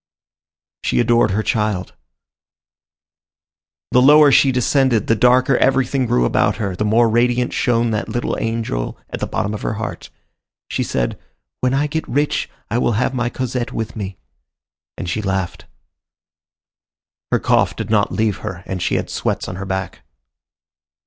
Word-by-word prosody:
She - - +1
adored 120 -2 +3
her 105 +3 0
child. 105 -5 -1 2.0
The 125 - +5
lower 145 +2 +7
she 135 0 +5
descended, 125 -2 +2
the 115 - +2
darker 125 +3 +4
everything 135 -1 +2
grew - - +2
about - - +2
her, 100 -4 -3
the 105 - -2
more 115 +3 +3
radiant 120 +2 +1
shone 120 -1 +1
that 110 +1 -2
little 120 - -2
angel 115 - -2
at - - -4
the - - -2
bottom 105 - -2
of 105 - -5
her 110 - -2
heart. 110 +1 -6 0.6
She - - -1
said, - - -2 0.4
"When 130 +1 +1
I 145 +2 +2
get 160 +2 -3
rich, 145 +3 0 0.2
I 115 +3 -1
will 120 - +1
have 120 +5 0
my 120 -2 -1
Cosette 125 -1 -3
with 115 0 -4
me;" 100 -3 -5 0.8
and - - -5
she 85 +5 -2
laughed. 95 -3 -3 1.7
Her - - +4
cough - - +2
did - - -5
not 105 -2 +2
leave 110 -3 0
her, 90 -1 -7
and 95 -2 -4
she - - 0
had - - -1
sweats - - -2
on 90 - -6
her 100 - -5
back. 95 -1 -4
115 Hz, 160 wpm, -19 LUFS, 100-125 Hz, 2.0 s, lower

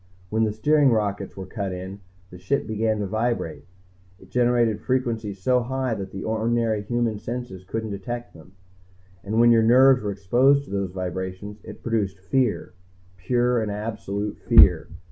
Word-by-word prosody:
"When 110 +1 +2
the 110 - -1
steering 145 +6 +3
rockets 100 -4 -1
were 95 - -6
cut 100 0 -4
in, 95 +2 -7 0.3
the 90 - -11
Ship 140 +9 -1
began 110 0 0
to - - -1
vibrate. 110 -4 -2 0.5
It - - -19
generated 120 -3 +2
frequencies 115 -6 -2
so 125 -1 +3
high 130 0 -2
that 95 -2 -6
ordinary 110 0 0
human 115 -1 -1
senses 120 -6 -6
couldn't 110 +3 -4
detect 120 +5 -6
them. 85 +3 -16 0.7
And 110 +3 -1
when 120 0 +6
your 115 -1 +5
nerves 125 +3 +6
were 105 - -2
exposed 125 +9 +3
to - - -13
those 100 -1 -1
vibrations, 95 +3 -5
it - - -11
produced 105 -5 -1
fear. 100 +1 -1 0.4
Pure 120 +5 +1
and 110 - -2
absolute 105 -1 -4
fear. - - +5
110 Hz, 160 wpm, -24 LUFS, 100-120 Hz, 0.7 s, when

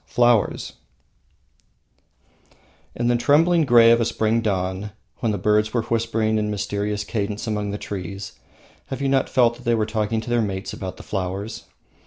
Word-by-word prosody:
Flowers 120 -3 +2 2.2
In 120 - -1
the 120 - +3
trembling 155 +7 +3
grey 120 -3 +7
of 115 0 +4
a - - +2
spring 110 +1 +1
dawn, 95 -1 -2 0.3
when 115 -4 0
the 105 - -1
birds 105 +3 +1
were 115 - +1
whispering 110 -1 0
in 105 0 -1
mysterious 105 0 -2
cadence 105 +1 -3
among 105 -2 -2
the 100 - -3
trees, 100 0 -6 0.6
have 135 - -5
you 140 - 0
not 135 -1 +2
felt 120 -2 +3
that 125 - -15
they 120 0 +2
were 110 -1 +1
talking 110 0 -1
to 110 - -7
their 120 -1 +3
mates 95 -3 -3
about 95 -1 -6
the - - -11
flowers? 100 +3 -4
110 Hz, 170 wpm, -22 LUFS, 100-120 Hz, 2.2 s, grey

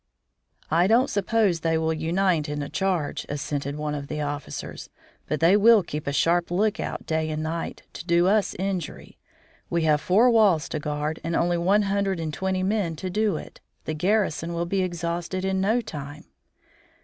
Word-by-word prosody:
"I 170 +3 +4
don't 240 +6 +3
suppose 200 -3 +1
they 160 0 +1
will 160 0 0
unite 165 0 0
in 150 0 -3
a 140 - -6
charge," 185 -6 -1
assented 145 -1 -3
one 150 0 -3
of 145 -1 -5
the 150 - -4
officers. 145 0 -5 0.4
"But 155 - -2
they 170 +4 +6
will 215 0 +6
keep 150 -3 -6
a - - +1
sharp 170 +4 +2
lookout 205 +4 -1
day 160 0 -1
and 155 0 -3
night 165 +1 -4
to - - -7
do 170 0 +3
us 205 +2 +2
injury. 185 -3 -4 0.5
We 170 -1 0
have 155 -1 +3
four 225 +7 +4
walls 200 -9 +4
to 155 - -3
guard 150 +1 -3
and 165 +1 -2
only 175 0 +1
one 195 +5 +3
hundred 195 -2 0
and 160 -2 -3
twenty 190 +2 -1
men 190 -4 0
to 185 +4 -5
do 210 -3 +1
it. - - -11 0.2
The 155 - -2
garrison 170 -1 0
will 170 +1 -1
be 190 +2 0
exhausted 175 +1 -3
in 190 0 0
no 220 +5 +2
time." 145 -6 -8
170 Hz, 185 wpm, -25 LUFS, 155-195 Hz, 0.5 s, they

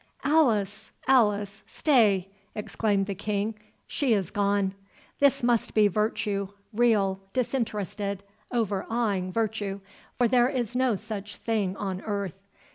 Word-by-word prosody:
"Alice, 225 -10 +2 0.2
Alice—stay!" 210 - +2 0.3
exclaimed 205 -1 0
the 200 - -3
King. 205 +2 -2 0.3
"She 270 -5 +1
is 195 -5 0
gone.—This 200 +7 0
must 240 -2 +1
be 215 -1 +6
virtue—real, 205 0 0
disinterested, 205 -5 -2 0.3
overawing 210 -3 -1
virtue—or 205 +1 -2
there 245 +1 +4
is 245 -4 -2
no 255 -3 +2
such 205 0 -6
thing 205 -4 -1
on 190 -2 -3
earth. 200 -2 -4
210 Hz, 100 wpm, -27 LUFS, 200-230 Hz, 0.3 s, be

